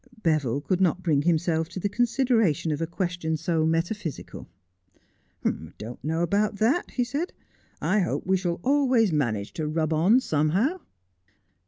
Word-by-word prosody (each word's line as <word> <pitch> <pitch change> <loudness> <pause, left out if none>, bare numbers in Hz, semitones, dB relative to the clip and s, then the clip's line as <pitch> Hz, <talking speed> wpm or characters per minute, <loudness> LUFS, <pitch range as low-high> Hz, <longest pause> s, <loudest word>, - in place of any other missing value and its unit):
Beville 145 -5 +1
could 185 +4 -1
not 185 0 +2
bring 150 -5 +2
himself 160 0 +1
to 185 - -6
the 205 - 0
consideration 230 - +1
of 150 +1 -2
a 165 - -1
question 175 -2 -2
so 160 0 0
metaphysical. 165 +1 -3 0.5
' - - -37
I - - +4 0.3
dont 115 +3 -8
know 160 +3 0
about 205 +4 +1
that,' 235 +12 +1
he 250 - -1
said. 290 +8 -3 0.3
' - - -36
I 210 - +4
hope 180 - -1
we 190 +1 +2
shall 175 -2 -2
always 255 - +3
manage 110 -9 -1
to 155 -2 -3
rub 155 +1 0
on 185 +11 +4
somehow.' 190 - +1
175 Hz, 165 wpm, -26 LUFS, 155-215 Hz, 0.5 s, I